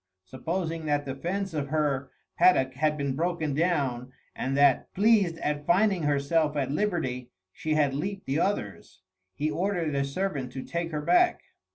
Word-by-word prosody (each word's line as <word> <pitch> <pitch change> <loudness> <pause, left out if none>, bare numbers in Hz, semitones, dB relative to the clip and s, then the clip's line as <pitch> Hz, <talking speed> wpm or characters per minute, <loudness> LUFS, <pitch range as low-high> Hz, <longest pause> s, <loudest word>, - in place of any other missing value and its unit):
Supposing 160 - -3
that 145 -1 0
the 135 - -3
fence 185 +6 -3
of 145 -2 -2
her 140 -3 0 0.3
paddock 130 -8 +4
had 150 +3 0
been 140 -2 -2
broken 160 -2 -1
down, 140 -6 0 0.2
and 135 +1 -2
that, 140 -2 +4
pleased 200 -5 +3
at 150 -1 -3
finding 190 +1 +3
herself 150 +1 +1
at 135 -2 -1
liberty, 150 -9 -1 0.2
she 155 -1 -2
had 145 -3 +2
leaped 195 +7 -4
the 135 +3 0
others, 105 - -3 0.3
he 150 +2 -1
ordered 175 -4 -1
a 140 0 +1
servant 140 -3 -3
to 130 - -5
take 170 0 -3
her 150 -2 -3
back. 360 - +3
150 Hz, 165 wpm, -27 LUFS, 140-175 Hz, 0.3 s, paddock